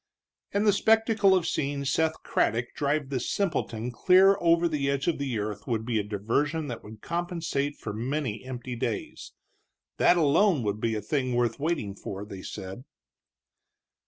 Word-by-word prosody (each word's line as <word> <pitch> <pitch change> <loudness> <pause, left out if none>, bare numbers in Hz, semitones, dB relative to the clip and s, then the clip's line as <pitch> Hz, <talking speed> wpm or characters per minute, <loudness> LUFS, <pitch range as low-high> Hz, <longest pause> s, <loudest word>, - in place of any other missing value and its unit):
And 205 +1 +1
the 205 - +5
spectacle 220 -1 +4
of 180 -3 +1
seeing 140 -3 -1
Seth 160 +3 0
Craddock 120 +1 0
drive 145 -1 -1
this 130 -3 -2
simpleton 125 - -1
clear 190 +9 +5
over 170 0 +4
the 145 -4 -1
edge 140 -1 -1
of 170 - +1
the 135 -5 -2
earth 105 -1 -4
would 110 -2 -1
be 115 -2 0
a - - -1
diversion 135 +10 -1
that 120 - -6
would 105 0 -11
compensate 170 -5 -2
for 105 - -6
many 120 0 -3
empty 125 -1 -6
days. 315 - -4 0.6
That 175 - +5
alone 160 - +3
would 105 0 -2
be 115 -1 0
a 105 - -2
thing 130 +1 -1
worth 120 +1 0
waiting 150 -10 -1
for, 100 0 -7
they 100 -3 -9
said. 95 +7 -7
140 Hz, 165 wpm, -27 LUFS, 115-170 Hz, 0.6 s, the